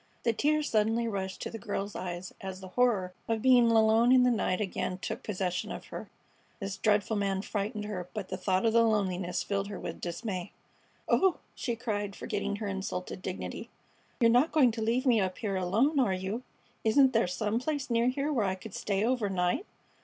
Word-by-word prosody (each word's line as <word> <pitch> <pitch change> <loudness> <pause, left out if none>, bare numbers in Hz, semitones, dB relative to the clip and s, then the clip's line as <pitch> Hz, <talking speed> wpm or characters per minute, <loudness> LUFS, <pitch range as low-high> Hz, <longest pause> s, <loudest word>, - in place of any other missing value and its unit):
The 230 - +2
tears 300 +5 +1
suddenly 225 +2 +2
rushed 190 -3 -3
to - - -4
the 225 - -6
girl's 200 -2 -4
eyes 180 0 -5
as 190 -1 -6
the 190 -1 -9
horror 200 -5 +1
of 225 -1 -1
being 250 -3 +6
alone 225 +1 +5
in 255 -1 +7
the 250 - +4
night 195 -5 0
again 185 -2 -2
took - - -4
possession 185 -3 -2
of - - -6
her. - - -7 0.5
This 195 -1 -4
dreadful 210 +1 +2
man 195 -1 0
frightened 210 +1 -3
her, 180 -4 -5
but 200 -3 -4
the - - -2
thought 190 +1 0
of 225 - +3
the 230 - +6
loneliness 190 -5 +1
filled 200 -1 -1
her 200 -2 -6
with - - -6
dismay. 180 +1 -4 0.5
"Oh!" 380 -2 +3 0.2
she 240 -3 -3
cried, 205 -4 -3
forgetting 205 0 -2
her 205 0 -4
insulted 190 -1 -4
dignity, 185 0 -5 0.5
"you're 230 -2 +5
not 250 +7 +4
going 280 -6 +5
to 225 0 -5
leave 235 +4 +1
me 235 -5 +4
up 185 -1 -2
here 205 -4 -2
alone, 220 - +2
are 205 -8 +3
you? 190 +6 -3 0.4
Isn't 260 +4 +5
there 225 -4 +3
some 210 +5 -1
place 280 -1 -3
near 235 +1 +3
here 280 +4 0
where 230 -7 +1
I 190 -1 0
could 190 +2 -10
stay 200 +1 0
overnight?" 205 - 0
210 Hz, 200 wpm, -30 LUFS, 190-235 Hz, 0.5 s, in